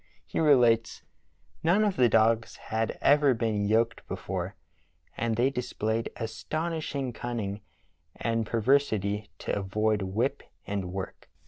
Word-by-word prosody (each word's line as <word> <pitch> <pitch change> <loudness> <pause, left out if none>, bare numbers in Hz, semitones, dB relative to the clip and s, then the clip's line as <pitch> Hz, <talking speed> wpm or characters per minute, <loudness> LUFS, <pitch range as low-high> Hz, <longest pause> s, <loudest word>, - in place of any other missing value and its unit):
He 80 - -3
relates: 120 -8 +4 0.6
"None 185 +6 +3
of 205 -3 +1
the 125 -2 +4
dogs 110 +1 +3
had 110 0 -2
ever 145 -2 +5
been 110 -3 0
yoked 115 +2 +1
before, 95 0 -4 0.6
and 115 -1 0
the}' 125 +4 +2
displayed 115 -3 -2
astonishing 140 +3 -3
cunnmg 110 -5 -4 0.5
and 115 -1 0
perversity 110 -4 +1
to - - -2
avoid 105 +2 0
whip 105 +8 -1 0.2
and 100 -3 -3
work. 95 0 -6
115 Hz, 120 wpm, -28 LUFS, 105-125 Hz, 0.6 s, ever